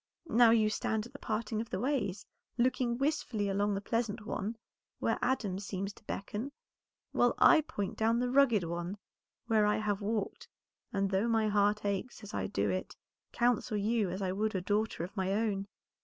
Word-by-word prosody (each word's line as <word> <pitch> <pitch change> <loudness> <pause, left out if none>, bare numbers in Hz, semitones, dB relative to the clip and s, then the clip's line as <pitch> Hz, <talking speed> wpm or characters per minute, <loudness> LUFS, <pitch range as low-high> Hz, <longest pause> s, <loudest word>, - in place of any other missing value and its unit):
Now 235 0 +7
you 220 -2 +4
stand 220 0 -1
at 240 - -13
the 280 - -10
parting 220 0 -2
of 230 - -7
the - - -2
ways, 245 -8 -1 0.3
looking 245 -1 +1
wistfully 260 -7 0
along 200 +1 +1
the 195 - -2
pleasant 220 -1 -2
one 215 +1 -3 0.4
where - - 0
Adam 225 -7 0
seems 195 0 -4
to - - -19
beckon, 210 +8 -4 0.6
while - - +3
I 315 - +7
point 245 -11 -4
down 225 +1 +2
the 245 +1 0
rugged 255 -7 +4
one 170 +3 -4 0.5
where 220 -3 +3
I 210 - +2
have 210 -1 -1
walked, 210 0 -2 0.4
and 195 -1 0
though 195 +4 +2
my 225 -2 +2
heart 205 +1 +2
aches 200 +3 -2
as 205 - -9
I 95 -1 -1
do 100 +1 0
it, 95 - -3 0.4
counsel 240 -2 +1
you 210 -1 +1
as 190 +3 -3
I 185 - 0
would 210 +2 -1
a 185 - 0
daughter 205 -1 0
of 185 +4 -7
my 190 -1 0
own." 200 -2 0
210 Hz, 185 wpm, -32 LUFS, 195-230 Hz, 0.6 s, Now